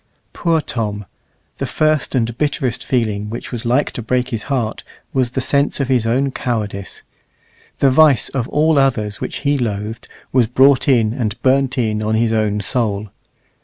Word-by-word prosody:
Poor 165 -2 +1
Tom! 105 -6 -3 0.5
the - - -2
first 155 -3 0
and 115 -2 0
bitterest 140 -5 -1
feeling 110 -5 -1
which 115 - -6
was 120 0 -5
like 125 +5 +1
to - - -5
break 125 +2 -1
his 115 -3 -3
heart 120 -6 -1 0.3
was 130 -3 +1
the 125 - -3
sense 140 +3 +1
of 135 -2 -1
his 125 -4 +2
own 135 +4 +1
cowardice. 105 -6 -4 0.7
The 135 - +3
vice 145 -2 +5
of 125 -3 -3
all 155 0 +3
others 110 -7 0
which - - -4
he 140 0 +2
loathed 110 0 -3 0.3
was 125 -3 +4
brought 130 +3 +4
in 115 -5 +3
and 115 -3 -3
burnt 130 0 +2
in 110 -3 0
on 110 +1 0
his 115 0 +1
own 105 -2 0
soul. 105 -2 -1
120 Hz, 170 wpm, -18 LUFS, 110-135 Hz, 0.7 s, vice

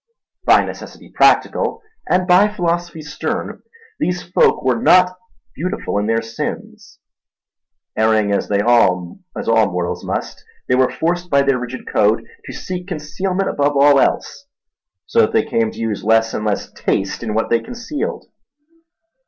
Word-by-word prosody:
By - - +5
necessity - - -10
practical 455 - +2 0.3
and 180 0 +2
by 180 +3 +5
philosophy 175 -4 -2
stern, 145 - -4 0.4
these 180 0 -1
folk 175 - +2
were 125 -3 +1
not 180 0 +5 0.4
beautiful 180 - -3
in 105 - -2
their 115 0 +1
sins. 115 0 -7 1.0
Erring 110 -2 +2
as - - -1
all 100 - +2 0.2
mortals 100 -6 0
must, - - -4 0.2
they - - +1
were 130 0 +3
forced 175 +2 -2
by 140 -2 +3
their 135 -2 +1
rigid 125 +1 -7
code 105 +1 +2 0.2
to - - -7
seek 180 0 -6
concealment 185 +3 -3
above 145 0 0
all 140 0 +6
else; 280 - -1 0.6
so 465 - +2
that 445 0 +1
they 445 - +3
came 230 -1 0
to - - -12
use 110 -3 -3
less 115 +1 +2
and 105 - -3
less 105 -1 -2
taste 95 0 -2
in 110 -3 -3
what 110 - -1
they 115 - +4
concealed. 240 - -5
140 Hz, 145 wpm, -18 LUFS, 110-180 Hz, 1.0 s, all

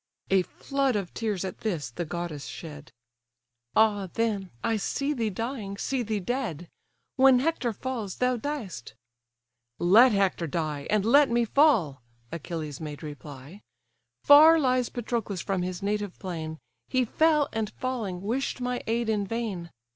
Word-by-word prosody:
A 190 -1 +5
flood 275 +6 -1
of 195 -4 -3
tears, 210 -5 -2
at 190 - -6
this, 160 - -3
the 175 +8 -4
goddess 165 -3 -5
shed: 150 -3 -9 0.8
"Ah 210 -3 +3
then, 215 -5 -1
I 225 - +1
see 275 +8 -1
thee 230 -5 -1
dying, 215 -1 -4
see 265 +4 -1
thee 215 -2 -2
dead! 195 - -3 0.5
When 265 -1 +7
Hector 270 -3 0
falls, 225 -4 -4
thou 250 0 +1
diest."—"Let 120 - 0
Hector 195 -4 +1
die, 150 -2 -3
And 210 -1 +2
let 280 +5 +6
me 235 0 +2
fall! 215 - +3 0.3
(Achilles 160 -3 -5
made 150 -2 -7
reply) 145 +4 -10 0.6
Far 310 +3 +8
lies 255 -3 +1
Patroclus 225 -6 -3
from 195 -3 -1
his 180 +1 -4
native 205 -1 -2
plain! 160 -4 -5 0.3
He 255 -1 +1
fell, 305 +3 +3
and 220 -2 -1
falling, 215 -7 -4
wish'd 255 +6 -2
my 250 0 -2
aid 230 +1 0
in 210 -2 0
vain. 205 -6 -4
205 Hz, 145 wpm, -27 LUFS, 170-245 Hz, 0.8 s, Far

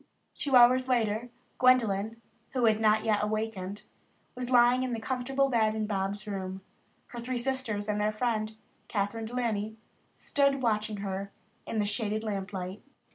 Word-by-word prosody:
Two 275 -3 0
hours 255 +1 +7
later 235 -2 +1 0.3
Gwendolyn, 230 -4 +3 0.3
who 250 -3 +2
had 220 -1 +3
not 215 0 +4 0.2
awakened, 210 -2 -3 0.5
was 250 0 -4
lying 245 0 +5
in 255 -1 -1
the 230 - -2
comfortable 265 +3 0
bed 220 -4 +2
in 215 -1 -1
Bobs' 200 0 -2
room. 190 -2 -4 0.5
Her 240 - -7
three 250 +2 -3
sisters 240 -5 -1
and 210 0 0
their 210 +1 +2
friend, 215 -1 -1 0.3
Kathryn 210 +2 -2
De 235 +3 -7
Laney, 220 -3 -1 0.4
stood 280 -2 +1
watching 215 -2 0
her 195 +1 -4 0.4
in 225 - -3
the 210 - +2
shaded 215 +1 -1
lamp 200 -2 -3
light. 185 +1 -5
220 Hz, 155 wpm, -29 LUFS, 205-245 Hz, 0.5 s, hours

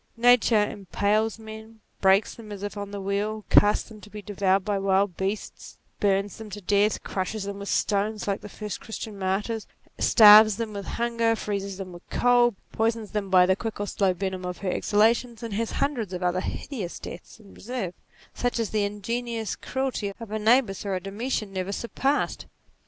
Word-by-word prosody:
Nature 230 -3 +5
impales 210 +2 0
men, 220 0 -11 0.2
breaks 195 +2 +4
them 220 -2 -11
as 200 -1 -7
if 205 +1 -4
on 205 -1 -5
the 200 0 -6
wheel, 205 +2 -2
casts 205 0 +5
them 215 -2 -13
to 210 - -13
be 210 - -8
devoured 195 -1 0
by 205 -2 0
wild 195 -1 +2
beasts, 195 +4 -4 0.2
burns 200 0 +1
them 220 -1 -9
to 205 +1 -7
death, 205 +2 +1
crushes 195 +2 -3
them 200 0 -5
w - - -9
r - - -6
ith - - -5
stones 210 +1 0
like 200 0 -1
the 210 - -9
first 210 0 -6
Christian 220 -2 -7
martyr, 195 +4 -1 0.4
starves 215 -1 +8
them 225 -2 -4
with 200 -1 -6
hunger, 230 -1 +1
freezes 200 -3 -4
them 190 -2 -7
with 175 - -11
cold, 245 -2 +3 0.2
poisons 225 -1 -1
them 210 -3 -2
by 185 -1 +6
the 190 +1 +3
quick 225 +1 -5
or 205 - -1
slow 195 -1 +1
venom 185 0 -3
of 180 0 -4
her 185 - +1
ex - - -3
halations, 230 +3 +2
and 225 -3 -5
has 225 +2 -2
hundreds 240 -9 -1
of 180 0 -4
other 180 +1 +1
hideous 205 -8 -5
deaths 175 - -10
in 200 -3 -16
reserve, 220 -6 -5 0.4
such 245 0 -1
as 225 -3 -1
the 215 -1 +1
ingenious 225 +2 -3
cruelty 260 -6 -3
of 230 -3 -9
a 220 - -2
Nabis 220 -3 +3
or 200 -2 -2
a - - -1
Domitian 210 +2 -3
never 190 +1 -3
surpassed. 270 +7 -1
210 Hz, 195 wpm, -26 LUFS, 195-225 Hz, 0.4 s, starves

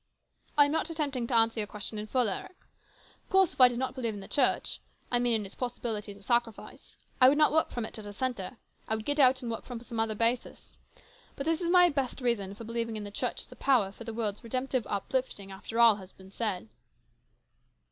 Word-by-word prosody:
I 290 - +8
am 285 - -1
not 320 - 0
attempting 280 -7 -2
to 240 - 0
answer 225 0 +3
your 210 - -1
question 210 +1 -5
in 210 - -5
full, 250 +1 +2
Eric. 205 - -5 0.7
Of - - -35
course 385 -2 +4
if - - -2
I 250 - +11
did 245 -1 -3
not 260 0 -2
believe 235 -5 -2
in - - -7
the 195 - -9
Church, 265 -3 +1 0.3
I 245 - +4
mean 240 -1 +2
in 215 -2 -1
its 195 - -7
possibilities 220 -5 -4
of 200 - -16
sacrifice, 235 -1 -2 0.2
I 255 - +10
would 290 - +2
not 305 -1 +5
work 315 +1 +2
from 240 -2 -3
it 220 - -7
as 210 - -8
a - - -6
centre. 240 -1 -3 0.3
I 220 - 0
would 220 0 -6
get 290 +1 0
out 260 -1 +5
and 235 - -3
work 225 - -4
from 245 -2 -7
some 235 -2 -5
other 225 -1 0
basis. 230 +3 -1 0.6
But 275 - -5
this 325 +2 +1
is 340 - -1
my 355 0 +7
best 275 -4 -2
reason 215 -6 -1
for 230 - -9
believing 230 0 -3
in 215 - -4
the 205 - -7
Church - - -2
as - - -16
a - - -10
power 240 -8 +2
for 230 - -11
the 225 - -5
world's 215 -2 -3
redemptive 255 0 -2
uplifting 200 -1 -3
after 205 +4 -5
all 235 -1 +9
else 210 - -3
has 190 -1 -12
been 190 0 -15
said." 200 - -2
235 Hz, 240 wpm, -30 LUFS, 210-260 Hz, 0.7 s, I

